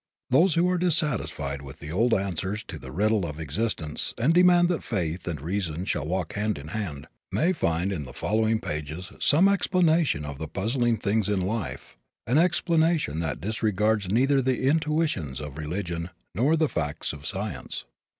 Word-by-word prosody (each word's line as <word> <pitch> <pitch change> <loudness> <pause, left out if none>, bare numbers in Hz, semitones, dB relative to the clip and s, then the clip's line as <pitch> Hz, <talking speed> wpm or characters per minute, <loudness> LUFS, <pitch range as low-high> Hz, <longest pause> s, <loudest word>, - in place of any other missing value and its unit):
Those 165 +6 +5
who 170 +2 +3
are 180 - +1
dissatisfied 105 - 0
with 70 0 -10
the 75 0 -8
old 115 +8 +2
answers 95 +2 -2
to - - -6
the 65 0 -9
riddle 105 +5 +2
of 75 -2 -5
existence 80 0 -2
and 130 +8 +3
demand 175 0 +6
that 175 - 0
Faith 85 -5 -2
and 80 -4 -2
Reason 85 +1 -2
shall 75 -6 -1
walk 90 -1 -2
hand 105 +1 -1
in 70 +1 -8
hand, 90 -9 -4 0.2
may 175 +4 +2
find 85 - 0
in 80 -7 -3
the 65 - -9
following 110 +1 +1
pages 75 +5 -5
some 165 +7 +5
explanation 170 - +2
of 70 -1 -6
the 80 - -4
puzzling 115 - 0
things 105 -1 0
in 100 -2 +1
life 100 - -4 0.3
an 130 +6 +3
explanation 165 - +2
that 80 -4 -2
disregards 105 0 0
neither 135 +6 +3
the 130 0 0
intuitions 150 - 0
of 75 0 -7
religion 85 +1 -3 0.2
nor 130 - +3
the 160 -1 +2
facts 75 - -3
of 70 -1 -10
science. 100 0 -4
100 Hz, 170 wpm, -26 LUFS, -, 0.3 s, demand